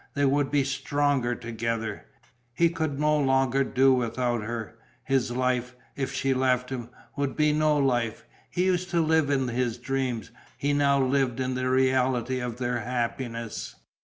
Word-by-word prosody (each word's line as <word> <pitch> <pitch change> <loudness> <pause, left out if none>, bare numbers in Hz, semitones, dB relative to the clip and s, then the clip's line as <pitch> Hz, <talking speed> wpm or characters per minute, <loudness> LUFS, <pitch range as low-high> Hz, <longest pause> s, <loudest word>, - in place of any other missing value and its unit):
They 145 0 +2
would 140 0 +2
be 145 -1 +2
stronger 140 -2 0
together. 115 -1 -4 0.5
He 170 0 +4
could 160 -4 -2
no 150 0 +3
longer 135 -1 +2
do 135 0 +4
without 120 -1 0
her; 115 +1 -5 0.2
his 130 -2 +1
life, 125 0 -1 0.2
if 135 -2 -2
she 135 0 0
left 130 -1 +1
him, 120 -3 -5 0.3
would 140 -2 -2
be 150 -1 +3
no 155 0 +3
life. 120 -5 0 0.2
He 180 +1 0
used 185 -1 +1
to 175 -1 +1
live 160 -2 +3
in 135 -2 +1
his 120 -1 -1
dreams; 130 -2 -2 0.3
he 145 +1 0
now 140 -1 +3
lived 130 -2 +1
in 130 0 -1
the 130 0 -1
reality 130 -1 +2
of 125 -2 -4
their 120 -1 -1
happiness. 115 -1 -4
130 Hz, 160 wpm, -27 LUFS, 120-140 Hz, 0.5 s, He